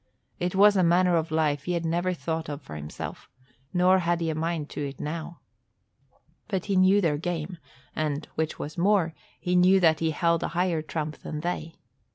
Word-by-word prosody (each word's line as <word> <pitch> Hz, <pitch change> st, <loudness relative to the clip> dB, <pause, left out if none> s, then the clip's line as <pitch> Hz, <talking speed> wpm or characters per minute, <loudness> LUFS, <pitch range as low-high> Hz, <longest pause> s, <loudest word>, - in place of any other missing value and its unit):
It 180 Hz, +1 st, -1 dB
was 205 Hz, +1 st, +6 dB
a 190 Hz, -, +4 dB
manner 175 Hz, +1 st, +4 dB
of 165 Hz, -1 st, 0 dB
life 150 Hz, -2 st, 0 dB
he 180 Hz, -, -1 dB
had 170 Hz, -1 st, -1 dB
never 175 Hz, +3 st, 0 dB
thought 165 Hz, -2 st, -3 dB
of 145 Hz, -1 st, -6 dB
for 75 Hz, -, -9 dB
himself, 75 Hz, 0 st, -7 dB, 0.4 s
nor 185 Hz, +1 st, +4 dB
had 170 Hz, -1 st, 0 dB
he 165 Hz, -1 st, -1 dB
a -, -, -2 dB
mind 160 Hz, -1 st, -2 dB
to 145 Hz, -, -3 dB
it 135 Hz, -, -12 dB
now. 165 Hz, +2 st, -5 dB, 1.1 s
But 190 Hz, -4 st, -2 dB
he 200 Hz, -, 0 dB
knew 190 Hz, +2 st, +5 dB
their 155 Hz, -5 st, +1 dB
game 175 Hz, 0 st, -4 dB, 0.4 s
and, 150 Hz, -1 st, -2 dB
which 160 Hz, 0 st, -2 dB
was 150 Hz, +3 st, -6 dB
more, 185 Hz, -3 st, +3 dB, 0.3 s
he 180 Hz, 0 st, -1 dB
knew 185 Hz, +2 st, +6 dB
that 160 Hz, -3 st, +4 dB
he 165 Hz, -, +1 dB
held 170 Hz, +1 st, +1 dB
a -, -, -1 dB
higher 175 Hz, -3 st, +1 dB
trump 155 Hz, -1 st, -4 dB
than 150 Hz, -1 st, -5 dB
they. 165 Hz, -1 st, -4 dB
170 Hz, 200 wpm, -27 LUFS, 155-180 Hz, 1.1 s, was